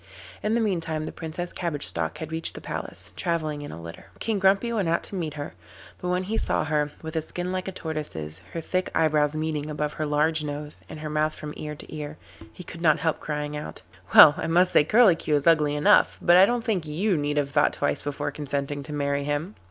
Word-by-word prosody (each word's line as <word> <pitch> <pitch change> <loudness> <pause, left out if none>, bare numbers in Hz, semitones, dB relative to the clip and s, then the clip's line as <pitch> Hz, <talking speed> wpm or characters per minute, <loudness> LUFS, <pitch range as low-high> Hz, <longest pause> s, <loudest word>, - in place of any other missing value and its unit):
In 215 +2 0
the 235 - +2
meantime 165 -7 -1
the - - -5
Princess 165 +2 -6
Cabbage 165 -5 -3
Stalk 80 -1 -1
had 160 0 -6
reached 160 0 -2
the - - -6
palace, - - -6
travelling 155 -4 -1
in 145 - -7
a - - -8
litter. 85 0 -10
King 220 -3 -1
Grumpy 195 +5 +3
went 200 -7 0
out 170 - +1
to - - -5
meet 165 -6 -3
her, 145 -1 -6 0.5
but 180 - -4
when 180 +1 +1
he 215 +4 -1
saw - - 0
her, 150 -1 0
with 160 +1 -6
a 160 - +1
skin 180 +3 -4
like 185 0 -3
a - - -2
tortoise's, 120 - -5
her 165 - -3
thick 185 +3 -1
eyebrows 150 -2 +2
meeting 155 -1 -2
above 150 0 -2
her 155 - -3
large 150 +2 +1
nose, 150 0 -6
and 155 - -8
her 155 - -4
mouth 155 0 0
from 150 0 -7
ear 150 0 -6
to 155 - -10
ear, 150 0 -6 0.3
he 145 - -11
could 165 -1 -10
not 160 -3 +4
help 160 -1 0
crying 150 -1 -3
out: 150 -9 -7 0.3
'Well, 150 - +11
I - - -2
must 175 +2 +3
say - - +6
Curlicue 180 -5 +4
is 145 - 0
ugly 150 -3 +4
enough, 150 - +4
but 175 - +5
I 185 +2 +8
don't 240 0 0
think 195 -9 -1
you 180 +6 0
need 145 -1 -1
have 140 -1 0
thought 145 0 +3
twice 145 - -1
before 145 0 -3
consenting 145 0 -3
to 150 +2 -5
marry 140 -1 0
him. 145 +7 -2
155 Hz, 230 wpm, -26 LUFS, 145-175 Hz, 0.5 s, Well